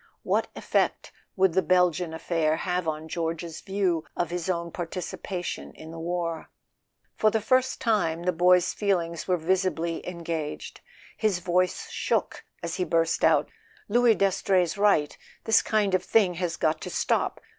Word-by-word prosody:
What - - +1
effect - - 0 0.2
would 190 -3 +3
the 190 - +3
Belgian 180 -1 +2
affair 160 -1 0
have 180 0 -2
on 155 0 -3
George's 165 0 -4
view 190 -5 0
of 175 - -1
his 175 0 -3
own 170 -2 -2
participation 180 +1 -5
in 160 +1 -11
the 165 - -8
war? 170 -1 -3 0.7
For 215 - +3
the 220 - +1
first 255 +4 +1
time 175 -8 +1
the 180 - +2
boy's 180 +1 +4
feelings 170 -5 -1
were 180 -1 +2
visibly 170 -1 0
en¬ 170 -1 -7
gaged; 160 -3 -4 0.4
his 215 -4 +1
voice 180 - 0
shook - - -1 0.2
as 170 -1 -3
he 185 - +1
burst 165 0 +1
out: - - +3 0.4
"Louis 235 +1 +4
Das 195 -1 +1
trey's 180 -4 +2
right: 200 -8 +2 0.3
this 225 - +4
kind 210 -3 +1
of 185 - +2
thing 200 -5 +3
has 170 -1 -3
got 155 0 0
to - - -5
stop. - - 0
175 Hz, 160 wpm, -26 LUFS, 165-190 Hz, 0.7 s, boy's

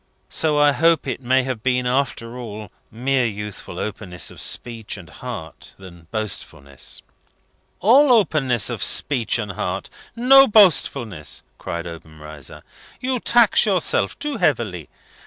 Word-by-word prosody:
So 155 -2 0
I 145 0 +5
hope 165 +2 +3
it 130 -1 -4
may 130 +1 +2
have 125 -4 -4
been, 125 0 0
after 125 -2 -1
all, 110 -4 -8 0.2
more 130 +3 0
youthful 105 -3 -5
openness 95 -4 -4
of - - -10
speech 115 -3 -3
and 90 -3 -12
heart 75 - -9
than 85 -3 -14
boastfulness." 80 - -6 0.8
"All 260 +8 +6
openness 150 - +2
of - - -5
speech 125 -6 +1
and 105 -4 -4
heart! 95 0 -4 0.2
No 270 +3 +7
boastfulness!" 140 - +2 0.2
cried 85 0 -5
Obenreizer. 80 -3 -10 0.4
"You 255 0 -1
tax 235 -2 +4
yourself 185 -5 +1
too 295 -3 -3
heavily. 115 - -1
120 Hz, 130 wpm, -21 LUFS, 95-160 Hz, 0.8 s, No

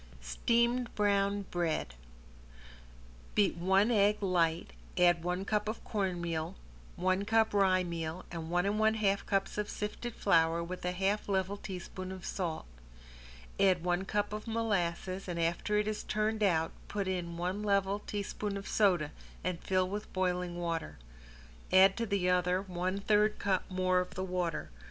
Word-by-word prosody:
~STEAMED 235 - +1
BROWN 200 -1 +2
BREAD~ 165 - -1 1.4
Beat 205 -2 +3
one 190 +6 +3
egg 210 -1 +4
light, 170 -4 +1 0.2
add 175 -2 +4
one 180 +2 -1
cup 210 0 0
of 220 - -5
cornmeal, 175 -6 -2 0.4
one 185 +2 +1
cup 220 +1 +2
rye 190 -2 +4
meal 170 0 -4
and 165 -1 -5
one 175 +1 +1
and 205 +2 0
one 220 0 +4
half 200 -2 +1
cups 195 +1 0
of 210 - -2
flour 200 -6 +1
sifted 170 0 -3
with 185 +1 -6
a 180 - +1
half 195 +3 0
level 190 0 0
teaspoon 185 -1 -7
of 190 -1 -8
salt. 170 -5 -3 0.9
Add 185 -3 +4
one 175 +1 0
cup 205 +1 -1
of 215 +2 -5
molasses, 195 -4 -1
and 175 -1 -3
after 170 +5 0
it 210 0 +1
is 215 -1 -2
turned 215 +1 -1
out 165 -5 +2 0.2
put 200 -2 -2
in 175 -2 -3
one 180 +4 -2
level 200 -1 +1
teaspoon 205 0 -4
of 200 - -7
soda 180 -8 +2 0.3
and 180 -1 -2
fill 185 -1 +1
with 205 +2 -5
boiling 180 -1 -1
water. 170 -2 -3 0.7
Add 190 +1 +7
to 230 -1 -1
the 195 -3 0
other 180 +1 +2
one 185 +1 -2
third 210 +1 +3
cup 190 -2 0
more 185 -1 +2
of 180 - -4
the 185 - -2
water. 180 - -2
190 Hz, 160 wpm, -32 LUFS, 175-205 Hz, 1.4 s, Add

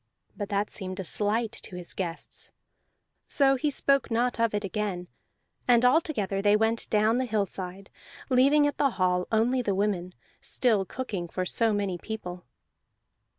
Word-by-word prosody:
But 205 -1 -5
that 205 0 -1
seemed 185 -2 -5
a - - -2
slight 210 +5 0
to 230 -5 -8
his 180 -1 -4
guests; 175 -3 -5 0.8
so 270 -1 +4
he 280 +3 0
spoke 275 -1 +2
not 240 +1 0
of 230 -2 +2
it 205 - -1
again, 195 -3 -3 0.6
and 245 0 +5
all 265 +7 +5
together 205 - -2
they 205 +1 +4
went 225 +1 0
down 215 +3 +3
the 260 - 0
hillside, 195 -3 -3 0.4
leaving 275 +3 +4
at 290 - -1
the 280 - +4
hall 180 -1 +1
only 235 +4 +2
the 205 -5 -1
women, 185 -3 -1 0.3
still 220 -6 +1
cooking 200 -7 -4
for 185 +2 -3
so 225 +4 +2
many 200 -4 -1
people. 180 -5 -7
210 Hz, 160 wpm, -27 LUFS, 190-245 Hz, 0.8 s, and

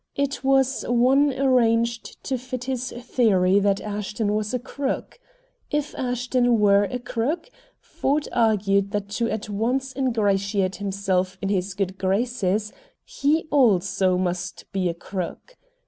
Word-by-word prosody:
It 280 -1 -2
was 270 -1 +2
one 260 +4 +4
arranged 235 -3 +1
to 265 - -1
fit 255 0 -6
with - - -5
his 255 0 -3
theory 210 -6 +2
that 200 -1 +2
Ashton 210 0 -2
was 210 0 -1
a 250 - 0
crook. 270 - -4 0.5
If 295 0 -2
Ashton 245 -1 +1
were 200 -1 +5
a 250 - -3
crook 250 - -3 0.3
Ford 290 +2 -1
argued 200 -4 +2
that 205 -1 -2
to 230 - +2
at 215 -1 -3
once 250 +6 -1
ingratiate 200 -6 0
himself 190 -2 -1
in 195 - -2
his 195 -1 -1
good 195 -1 -2
graces 210 0 0 0.3
he 320 - 0
also 195 -8 +3
must 180 0 -3
be 185 -2 0
a 170 - -3
crook. 185 - -6
225 Hz, 140 wpm, -24 LUFS, 195-255 Hz, 0.5 s, were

